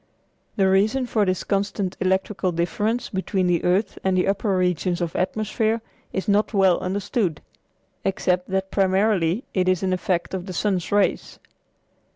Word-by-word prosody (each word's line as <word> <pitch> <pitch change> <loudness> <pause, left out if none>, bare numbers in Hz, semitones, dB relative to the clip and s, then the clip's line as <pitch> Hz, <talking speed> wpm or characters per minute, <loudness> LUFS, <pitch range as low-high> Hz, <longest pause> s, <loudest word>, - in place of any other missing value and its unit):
The 195 -3 +3
reason 210 +7 +2
for 220 -4 +1
this 185 -1 -1
constant 200 -1 -1
electrical 190 0 0
difference 210 +8 -1
between 190 -1 -1
the 175 -1 +1
earth 185 +4 +1
and 190 -1 +1
the 180 - +2
upper 195 0 +1
regions 180 -1 0
of 170 -2 -3
atmosphere 215 +4 0 0.3
is 190 - -3
not 210 +1 +2
well 190 -3 +4
understood, 190 -2 -1 0.6
except 180 -1 0
that 190 0 -1
primarily 195 0 +2
it 185 -1 +2
is 185 0 +1
an 185 -1 +1
effect 180 -2 -1
of 185 0 -4
the 185 - -5
sun's 185 -2 -1
rays. 205 -1 +1
190 Hz, 155 wpm, -23 LUFS, 180-205 Hz, 0.6 s, well